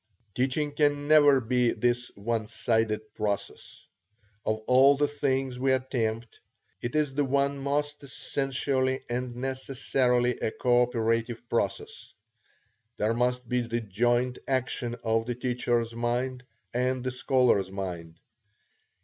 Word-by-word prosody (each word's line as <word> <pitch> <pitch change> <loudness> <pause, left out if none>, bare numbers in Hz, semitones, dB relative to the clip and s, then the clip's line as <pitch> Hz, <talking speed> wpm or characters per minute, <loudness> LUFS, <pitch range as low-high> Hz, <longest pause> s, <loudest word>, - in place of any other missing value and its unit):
Teaching 135 +5 0
can 145 -1 +1
never 145 -3 +6
be 125 0 +1
this 120 0 0
one 110 +2 -2
sided 110 -1 -1
process. 100 -2 -4 0.6
Of 110 - 0
all 135 +2 +6
the 145 +1 +2
things 135 -3 -1
we 135 0 +2
attempt, 115 -3 -2 0.4
it 120 +3 -4
is 150 -3 +1
the 145 +1 +1
one 140 +1 +1
most 145 +2 -1
essentially 130 -1 -1
and 125 0 -3
necessarily 125 -1 0
a - - 0
coöperative 120 -1 +1
process. 115 -4 -3 0.8
There 110 +1 +1
must 125 +1 0
be 125 0 +1
the 120 0 -2
joint 120 +4 0
action 125 -2 -1
of 115 0 +1
the 120 - -2
teacher's 120 -2 -1
mind 125 +2 -2 0.3
and 125 +1 0
the 130 - -1
scholar's 125 -6 +2
mind. 90 -4 -6
125 Hz, 125 wpm, -28 LUFS, 115-130 Hz, 0.8 s, never